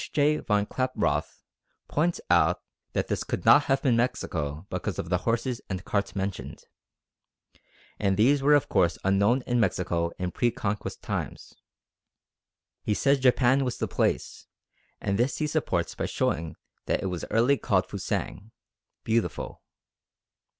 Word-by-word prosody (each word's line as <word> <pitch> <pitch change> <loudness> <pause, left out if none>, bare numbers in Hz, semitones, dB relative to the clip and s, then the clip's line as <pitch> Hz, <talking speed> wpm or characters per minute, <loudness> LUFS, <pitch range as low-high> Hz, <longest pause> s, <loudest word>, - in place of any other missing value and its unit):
J. 150 +1 +3
von 105 -1 +1
Klaproth 130 +3 -1 0.4
points 165 +3 0
out - - +3 0.3
that - - 0
this - - -1
could - - -4
not - - +7
have 135 0 +1
been 130 -5 +3
Mexico 85 - -2
because - - -3
of 85 - -4
the 90 -1 +2
horses 120 +1 -1
and 95 -2 -4
carts 100 -1 -1
mentioned, 95 -1 -4 1.4
and 95 -2 +1
these 135 +6 +4
were 145 +2 +5
of 145 - +2
course 85 -4 +2
unknown 100 +7 +3
in 120 -1 0
Mexico 85 -5 0
in 90 -1 -3
pre 120 +7 +1
Conquest 105 -4 -4
times. - - -5 1.3
He 105 - 0
says 140 +4 +3
Japan 130 +1 +4
was 125 -2 -2
the - - -2
place, - - -1 0.5
and 100 +1 -1
this 125 +1 +1
he 155 - 0
supports 150 - -1
by - - -3
showing 80 0 -1 0.3
that - - 0
it 95 - -2
was 90 - -4
early 120 +6 +3
called - - +1
Fusang 105 +3 -4 0.5
(beautiful). 115 0 -1
115 Hz, 145 wpm, -27 LUFS, 95-130 Hz, 1.4 s, not